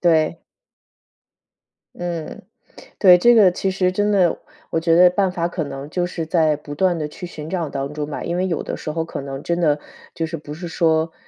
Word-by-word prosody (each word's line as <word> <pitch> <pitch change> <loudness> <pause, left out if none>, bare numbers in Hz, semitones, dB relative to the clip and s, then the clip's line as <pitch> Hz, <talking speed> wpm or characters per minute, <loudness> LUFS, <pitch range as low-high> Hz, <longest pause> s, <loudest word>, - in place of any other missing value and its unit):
对。 165 -1 +2 1.5
嗯， 170 -3 -5 0.6
对， 180 -3 +8
这 240 +7 +5
个 195 -5 +6
其 190 +1 -1
实 185 -1 +1
真 205 +2 +1
的， 185 -5 +3 0.3
我 165 - 0
觉 165 0 +3
得 180 0 +8
办 190 +1 +1
法 170 -2 -1
可 175 -1 -3
能 140 -1 -6
就 175 +3 -1
是 170 -2 -4
在 155 -2 +2
不 145 0 -9
断 180 +1 +1
地 150 - -2
去 175 +4 -8
寻 155 -2 -8
找 170 -4 -2
当 140 +1 -4
中 150 0 -4
吧。 - - -5
因 170 +1 -2
为 185 +1 0
有 165 - -1
的 - - -4
时 155 - -6
候 160 +1 -2
可 160 - -6
能 135 0 -6
真 170 0 -1
的， 150 -3 +2 0.4
就 165 - -2
是 165 - -5
不 150 -1 -9
是 175 +3 -7
说 160 0 +1
165 Hz, 230 characters per minute, -21 LUFS, 155-180 Hz, 1.5 s, 对